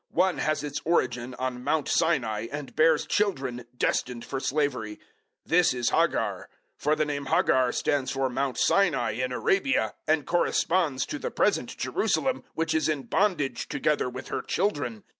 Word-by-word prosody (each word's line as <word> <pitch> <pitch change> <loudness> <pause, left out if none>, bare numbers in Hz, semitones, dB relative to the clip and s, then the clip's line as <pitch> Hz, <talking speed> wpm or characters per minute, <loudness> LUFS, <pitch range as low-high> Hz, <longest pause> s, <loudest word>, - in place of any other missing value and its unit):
One 185 +1 +1
has 155 -1 0
its 145 -1 -4
origin 125 -7 0
on 125 -1 -4
Mount 150 +1 0
Sinai, 115 -10 +1
and 145 -1 -6
bears 160 -1 +4
children 135 - -1
destined 125 -1 -1
for 135 - -3
slavery. 130 -7 -1
004:025 - - -28 0.5
This 175 -2 +3
is 120 -1 +1
Hagar; - - 0 0.3
for 150 +1 +1
the 155 - +1
name 140 -2 -4
Hagar 130 -1 +3
stands 140 -2 0
for 135 -1 0
Mount 130 +1 -2
Sinai 155 - +2
in 125 +4 -2
Arabia, 195 - +1
and 155 -2 +2
corresponds 170 -4 +1
to 300 - -5
the 485 - -3
present - - 0
Jerusalem, 265 -1 0
which 165 0 0
is 160 0 +1
in 145 -3 -1
bondage 165 - 0
together 150 -5 0
with 130 +1 -8
her - - -2
children. 145 - -2
145 Hz, 160 wpm, -27 LUFS, 125-165 Hz, 0.5 s, bears